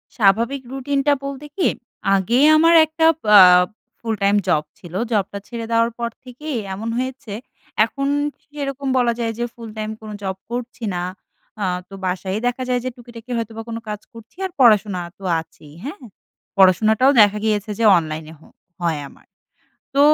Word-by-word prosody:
স্বাভাবিক 230 Hz, +6 st, +2 dB
রুটিনটা 275 Hz, +2 st, +1 dB
বলতে 275 Hz, +1 st, -6 dB
কি, 375 Hz, -, +2 dB, 0.5 s
আগে 215 Hz, +7 st, +2 dB, 0.2 s
আমার 330 Hz, +1 st, +5 dB
একটা 320 Hz, +1 st, 0 dB, 0.3 s
আ -, -, +11 dB, 0.6 s
full-time 205 Hz, -3 st, +1 dB
job 150 Hz, -1 st, +2 dB, 0.2 s
ছিল। 175 Hz, -1 st, -12 dB, 0.2 s
Job 205 Hz, -4 st, +2 dB
টা 200 Hz, -, -3 dB
ছেড়ে 235 Hz, -2 st, -5 dB
দেওয়ার 230 Hz, +1 st, +3 dB
পর 235 Hz, -1 st, -2 dB
থেকেই 260 Hz, +2 st, -6 dB, 0.2 s
এমন 220 Hz, +4 st, -4 dB
হয়েছে। 255 Hz, -3 st, -4 dB, 0.5 s
এখন 275 Hz, +4 st, -3 dB, 0.4 s
সেরকম 280 Hz, -2 st, -5 dB
বলা 240 Hz, -2 st, +3 dB
যায় 230 Hz, -1 st, 0 dB
যে 240 Hz, -, 0 dB
ফুল-টাইম 220 Hz, -2 st, -6 dB
কোনো 215 Hz, -1 st, -8 dB
job 190 Hz, -1 st, -2 dB, 0.2 s
করছি 240 Hz, -1 st, -5 dB
না। 175 Hz, -, -2 dB, 0.6 s
আ 200 Hz, -, +1 dB, 0.2 s
তো 195 Hz, -, -13 dB
বাসায়ই 185 Hz, +2 st, -2 dB
দেখা 245 Hz, +1 st, -2 dB
যায় 250 Hz, 0 st, +2 dB
যে -, -, 0 dB
টুকিটাকি 240 Hz, 0 st, -12 dB
হয়তো 230 Hz, -1 st, -3 dB
বা -, -, -3 dB
কোনো 230 Hz, 0 st, -4 dB
কাজ 210 Hz, -1 st, -4 dB
করছি 230 Hz, +4 st, -14 dB
আর 375 Hz, -, -4 dB
পড়াশোনা 210 Hz, -6 st, +4 dB, 0.2 s
তো 195 Hz, -, -16 dB, 0.2 s
আছেই, 150 Hz, -2 st, -13 dB
হ্যাঁ। 295 Hz, +1 st, -7 dB, 0.6 s
পড়াশোনাটাও 215 Hz, +7 st, +5 dB
দেখা 210 Hz, 0 st, +4 dB
গিয়েছে 210 Hz, 0 st, 0 dB
যে -, -, +1 dB
অনলাইনে 155 Hz, -1 st, -4 dB
হ -, -, -27 dB, 0.4 s
হয় 165 Hz, -3 st, 0 dB
আমার। -, -, -21 dB, 0.7 s
তো 280 Hz, -, +3 dB
230 Hz, 165 wpm, -21 LUFS, 200-260 Hz, 0.7 s, আ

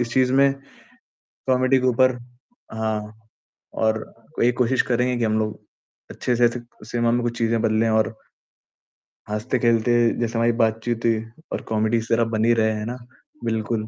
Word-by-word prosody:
इस 115 Hz, -1 st, -2 dB
चीज़ 130 Hz, -1 st, +3 dB
में, 135 Hz, 0 st, +5 dB, 0.9 s
कॉमेडी 130 Hz, +1 st, +3 dB
के 130 Hz, -, 0 dB
ऊपर। 130 Hz, +1 st, +4 dB, 0.6 s
हाँ, 110 Hz, 0 st, -4 dB, 0.5 s
और 110 Hz, 0 st, 0 dB, 0.4 s
ये 120 Hz, -, +5 dB
कोशिश 125 Hz, +1 st, +3 dB
करेंगे 125 Hz, +1 st, +1 dB
की 115 Hz, -, 0 dB
हम 110 Hz, 0 st, +1 dB
लोग 110 Hz, -1 st, -3 dB, 0.5 s
अच्छे 125 Hz, -, -1 dB
से 120 Hz, 0 st, +5 dB
स 120 Hz, 0 st, -6 dB, 0.3 s
सिनेमा 120 Hz, -1 st, +1 dB
में 120 Hz, -, +1 dB
कुछ 120 Hz, 0 st, -3 dB
चीज़ें 115 Hz, -1 st, +1 dB
बदले। 110 Hz, 0 st, +2 dB
और 110 Hz, 0 st, +1 dB, 1.2 s
हँसते-खेलते 115 Hz, +1 st, +1 dB, 0.3 s
जैसे 115 Hz, -1 st, -1 dB
हमारी 115 Hz, +1 st, +3 dB
बातचीत 115 Hz, +1 st, -1 dB
हुई 115 Hz, -1 st, +2 dB, 0.3 s
और -, -, -3 dB
कॉमेडी 110 Hz, +2 st, +2 dB
इस 115 Hz, 0 st, -4 dB
तरह 115 Hz, 0 st, +3 dB
बन 110 Hz, -, +1 dB
ही 120 Hz, -, +5 dB
रहे 110 Hz, -1 st, +2 dB
है 105 Hz, 0 st, -4 dB
ना 125 Hz, +2 st, -4 dB, 0.5 s
बिल्कुल। 110 Hz, -1 st, -1 dB
115 Hz, 165 wpm, -23 LUFS, 110-120 Hz, 1.2 s, में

